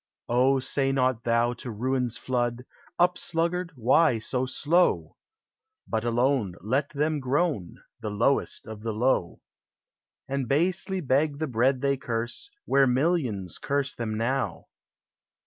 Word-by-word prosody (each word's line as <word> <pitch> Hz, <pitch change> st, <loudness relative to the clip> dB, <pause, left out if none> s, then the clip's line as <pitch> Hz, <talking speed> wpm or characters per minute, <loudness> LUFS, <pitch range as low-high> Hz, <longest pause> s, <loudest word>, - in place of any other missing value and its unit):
O, 130 Hz, +3 st, +4 dB
say 135 Hz, +1 st, 0 dB
not 130 Hz, -3 st, +1 dB
thou 120 Hz, +1 st, +2 dB
to 120 Hz, +1 st, -8 dB
ruin's 125 Hz, +1 st, -1 dB
flood, 120 Hz, 0 st, -2 dB, 0.3 s
"Up, 180 Hz, +1 st, +3 dB
sluggard! 170 Hz, +1 st, -1 dB
why 125 Hz, +2 st, +4 dB
so 125 Hz, +3 st, -1 dB
slow? 145 Hz, -, +1 dB, 0.4 s
" 440 Hz, -1 st, -29 dB
lint 110 Hz, +1 st, 0 dB
alone, 120 Hz, -5 st, +1 dB
Let 130 Hz, -, 0 dB
them 150 Hz, +1 st, 0 dB
groan, 135 Hz, -, -1 dB, 0.2 s
The 105 Hz, -, -4 dB
lowest 115 Hz, +7 st, +1 dB
of 110 Hz, -1 st, -8 dB
the 110 Hz, 0 st, -3 dB
low; 110 Hz, -6 st, 0 dB, 0.9 s
And 135 Hz, -2 st, -2 dB
basely 185 Hz, -, 0 dB
beg 140 Hz, +1 st, +1 dB
the 155 Hz, -, -1 dB
bread 130 Hz, 0 st, +1 dB
they 140 Hz, -1 st, +1 dB
curse, 120 Hz, -, -4 dB, 0.2 s
Where 135 Hz, 0 st, +4 dB
millions 125 Hz, -, 0 dB
curse 140 Hz, -1 st, -1 dB
them 110 Hz, -2 st, -3 dB
now 130 Hz, +4 st, -2 dB
130 Hz, 135 wpm, -27 LUFS, 115-145 Hz, 0.9 s, O